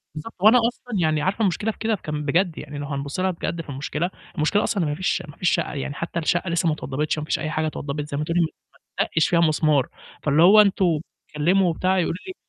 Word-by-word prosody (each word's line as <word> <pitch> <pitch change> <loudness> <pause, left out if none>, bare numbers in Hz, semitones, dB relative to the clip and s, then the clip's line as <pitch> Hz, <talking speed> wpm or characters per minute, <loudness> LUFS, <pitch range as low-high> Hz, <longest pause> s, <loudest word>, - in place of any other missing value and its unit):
بالضبط، 155 +9 -7
وأنا 215 +6 +7
أصلًا 245 -2 -5
يعني 155 -2 +1
عارفة 190 +7 -1
المشكلة 210 +2 +1
في - - -17
كده 220 0 0
كان 150 -4 -5
بجد، 170 +3 +1
يعني 150 -1 -7
لو 145 - -4
هنبُص 140 +2 -4
لها 185 0 +1
بجد 170 0 -4
في 155 - -13
المشكلة، 150 +5 -3 0.3
المشكلة 175 +6 +1
أصلًا 195 -5 0
إن 150 - -1
ما 145 - -2
فيش 185 +2 -1
ما 145 - -13
فيش 180 - +2
شَقّة، 170 - -1
يعني 140 0 -4
حتى 165 +2 -4
الشَقّة 175 +2 0
لسّه 170 0 +1
ما 155 - +3
اتوضّبتش، 150 +1 -2
ما 150 - -5
فيش - - -1
أي 155 - -3
حاجة 155 -1 -1
اتوضّبت، 145 -1 -4
زي 140 - -3
ما 150 - -1
تقولي 165 +3 0
ما 165 - +2 0.5
اتدّقش 160 - +1
فيها 170 - +3
مسمار. 155 -4 +3 0.4
فاللي 150 +1 +3
هو: 205 +4 +8
"أنتم 185 -6 +2 0.3
بتتكلّموا 175 +5 +2
وبتاع،" 185 +3 +1
يقولوا 165 - 0
لي 375 - -5
165 Hz, 240 wpm, -23 LUFS, 150-185 Hz, 0.5 s, هو